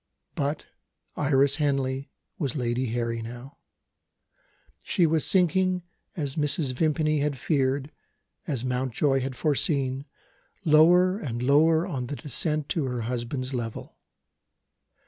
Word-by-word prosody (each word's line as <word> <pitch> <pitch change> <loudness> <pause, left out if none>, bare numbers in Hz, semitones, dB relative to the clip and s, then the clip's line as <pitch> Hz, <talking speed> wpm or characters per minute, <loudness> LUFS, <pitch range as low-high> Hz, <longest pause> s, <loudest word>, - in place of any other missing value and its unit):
But 145 +2 -2 0.5
Iris 140 -1 +2
Henley 135 -2 -1 0.3
was 140 -5 -2
Lady 125 -1 -1
Harry 115 0 -2
now. 120 +4 -9 1.2
She 175 - +2
was 160 -1 +2
sinking 185 0 +2 0.3
as 145 -4 -2
Mrs. 145 -2 +2
Vimpany 155 +2 +1
had 145 -1 -1
feared, 135 +1 0 0.6
as 130 -6 -2
Mountjoy 130 +2 0
had 130 0 -4
foreseen 135 -1 0 0.6
lower 175 +5 +5
and 120 - -4
lower 160 +5 +4
on 135 -10 -4
the 145 - -4
descent 150 +1 0
to 160 -5 0
her 125 -2 -3
husband's 125 +3 -3
level. 115 -3 -5
140 Hz, 115 wpm, -26 LUFS, 130-155 Hz, 1.2 s, lower